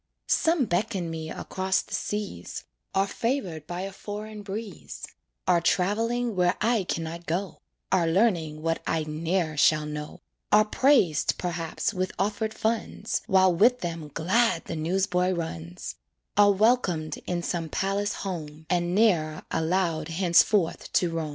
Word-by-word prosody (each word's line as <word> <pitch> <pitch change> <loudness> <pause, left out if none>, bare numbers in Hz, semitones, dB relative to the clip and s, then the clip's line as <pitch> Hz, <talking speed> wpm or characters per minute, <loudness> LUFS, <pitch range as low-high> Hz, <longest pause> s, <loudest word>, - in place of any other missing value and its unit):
Some 325 -5 +3
beckon 180 -2 -1
me 160 -1 -5
across 190 +2 -1
the - - -11
seas, 205 - -4 0.3
Are 195 0 +4
favored 195 - -2
by 175 +1 -4
a 195 +1 -4
foreign 210 +2 -7
breeze, 205 +1 -7 0.4
Are 175 -2 +4
traveling 225 +6 +1
where 180 -1 +3
I 225 -2 +2
can 165 - -2
not 165 +1 -7
go, 180 +5 -2 0.3
Are 175 -3 +3
learning 165 -5 +1
what 165 0 0
I 160 -1 +1
ne'er 160 +1 -1
shall 155 +1 +4
know, 150 0 -6 0.3
Are 215 +1 +6
praised, 215 - +3
perhaps, 170 +3 -2
with 185 -1 -2
offered 210 +3 -1
funds, 225 0 -1
While 190 -1 +5
with 240 +8 +4
them 165 -3 -4
glad 185 - +2
the 165 - -4
newsboy 180 +3 +1
runs; 90 - -5 0.4
Are 205 +1 +6
welcomed 195 -7 +2
in 175 -1 -1
some 165 -2 -2
palace 200 +4 0
home, 160 -4 -5
And 175 0 +1
ne'er 170 -8 +2
allowed 160 -1 0
henceforth 170 +2 +2
to 175 -2 +2
roam. 165 -2 -2
180 Hz, 145 wpm, -27 LUFS, 165-205 Hz, 0.4 s, Are